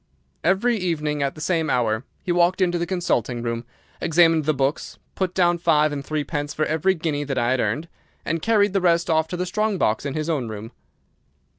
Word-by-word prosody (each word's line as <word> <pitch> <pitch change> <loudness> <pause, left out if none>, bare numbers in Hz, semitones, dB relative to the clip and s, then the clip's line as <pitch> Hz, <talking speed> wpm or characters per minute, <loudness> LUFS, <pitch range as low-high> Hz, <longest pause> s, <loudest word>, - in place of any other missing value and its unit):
Every 205 +7 +2
evening, 155 -6 -1
at 140 -1 -1
the 155 - -10
same 160 -2 0
hour, 115 -3 +1 0.2
he 180 - -1
walked 175 +2 +3
into 175 -2 +1
the 170 - -2
consulting 125 - -1
room, 115 0 -3 0.4
examined 165 -2 +4
the 155 - +3
books, 135 +3 -2 0.2
put 185 -1 -2
down 175 -2 +3
five 155 -3 +3
and 140 -1 -4
three 155 +1 -2
pence 145 -1 -4
for 155 - +1
every 160 +5 +1
guinea 155 -3 -2
that 135 -2 -3
I 120 0 +1
had 130 - +1
earned, 155 +6 -1 0.4
and 165 0 -1
carried 205 -2 +3
the 195 - +1
rest 170 -1 +2
off 160 0 +2
to 180 - -5
the 180 - -1
strong 210 +2 0
box 110 -9 +1
in 140 -1 -4
his 155 0 -2
own 145 -8 -1
room. 110 +1 -7
160 Hz, 210 wpm, -23 LUFS, 140-175 Hz, 0.4 s, examined